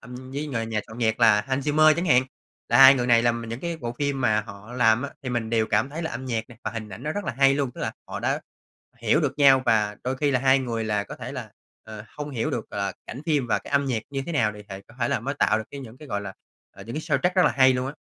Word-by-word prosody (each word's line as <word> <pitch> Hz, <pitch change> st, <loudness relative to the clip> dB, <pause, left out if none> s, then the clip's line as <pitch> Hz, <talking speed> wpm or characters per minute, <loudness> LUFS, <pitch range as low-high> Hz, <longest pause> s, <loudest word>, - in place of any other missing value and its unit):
âm 125 Hz, +1 st, -10 dB
với 145 Hz, +2 st, -3 dB
ng 115 Hz, -5 st, -3 dB
nhà 110 Hz, -2 st, -1 dB
soạn 110 Hz, +2 st, -11 dB
nhạc 110 Hz, 0 st, 0 dB
là 110 Hz, -2 st, +6 dB
Hans 135 Hz, +5 st, -2 dB
Zimmer 155 Hz, +1 st, +5 dB
chẳng 170 Hz, +3 st, -2 dB
hạn. 125 Hz, -4 st, +5 dB, 0.5 s
Là -, -, +3 dB
hai 135 Hz, 0 st, +10 dB
người 125 Hz, -2 st, -1 dB
này 115 Hz, -1 st, +5 dB
làm 120 Hz, -1 st, 0 dB
những 115 Hz, +3 st, -5 dB
cái 170 Hz, -1 st, -3 dB
bộ 120 Hz, -6 st, -5 dB
phim 140 Hz, -2 st, -1 dB
mà 110 Hz, -3 st, +2 dB
họ 100 Hz, +1 st, -11 dB
làm 120 Hz, -1 st, +3 dB
á, 140 Hz, -, -4 dB
thì 130 Hz, -, -4 dB
mình 120 Hz, -2 st, -2 dB
đều 115 Hz, -1 st, +2 dB
cảm 110 Hz, +6 st, +1 dB
thấy 165 Hz, +3 st, -5 dB
là 160 Hz, -, -3 dB
âm 130 Hz, -, -6 dB
nhạc 115 Hz, -3 st, -2 dB, 0.2 s
và -, -, -2 dB
hình 110 Hz, -2 st, -6 dB
ảnh 105 Hz, +5 st, -10 dB
nó 150 Hz, +1 st, -2 dB
rất 205 Hz, -1 st, -4 dB
là -, -, -3 dB
hay 135 Hz, 0 st, +5 dB
luôn. 140 Hz, -3 st, -1 dB
Tức -, -, -9 dB
là -, -, -2 dB, 0.2 s
họ -, -, -5 dB
đã -, -, 0 dB, 0.6 s
hiểu 115 Hz, +7 st, +2 dB
được 145 Hz, -1 st, -2 dB
nhau, 135 Hz, -2 st, +6 dB
và 105 Hz, -3 st, +2 dB
đôi 130 Hz, +1 st, -1 dB
khi 145 Hz, +1 st, +1 dB
là 125 Hz, -2 st, +1 dB
hai 135 Hz, 0 st, +4 dB
người 115 Hz, -3 st, -3 dB
là 105 Hz, -1 st, -1 dB
có -, -, -9 dB
thể -, -, -7 dB
là, -, -, -7 dB, 0.3 s
ờ, 110 Hz, -1 st, -9 dB
hông 150 Hz, 0 st, -5 dB
hiểu 120 Hz, -5 st, -2 dB
được, -, -, -4 dB
gọi -, -, -4 dB
là, -, -, -1 dB
cảnh 130 Hz, -, -7 dB
phim 145 Hz, -6 st, +1 dB
và -, -, +1 dB
cái -, -, -12 dB
âm 140 Hz, 0 st, +2 dB
nhạc 120 Hz, -5 st, -1 dB
như 135 Hz, -1 st, -3 dB
thế 170 Hz, -, -4 dB
nào 115 Hz, -7 st, +1 dB
thì 105 Hz, -, -10 dB
thệ 95 Hz, 0 st, -7 dB
có 115 Hz, -, -17 dB
thể 120 Hz, -, +1 dB
là -, -, 0 dB
mới 140 Hz, +4 st, -3 dB
tạo 125 Hz, -, +2 dB
được 110 Hz, -, -5 dB
cái 140 Hz, -, -8 dB
những 125 Hz, -2 st, -11 dB
cái, 150 Hz, -3 st, -12 dB
gọi 100 Hz, -, -2 dB
là, 100 Hz, -1 st, -7 dB, 0.4 s
ờ, 95 Hz, -, -10 dB
những 115 Hz, -, -7 dB
cái 155 Hz, -, -2 dB
soundtrack 180 Hz, +3 st, 0 dB
rất 185 Hz, -, +6 dB
là -, -, +4 dB
hay 130 Hz, -1 st, +5 dB
luôn 125 Hz, 0 st, -2 dB
á. 135 Hz, -, -4 dB
125 Hz, 310 wpm, -25 LUFS, 110-140 Hz, 0.6 s, hai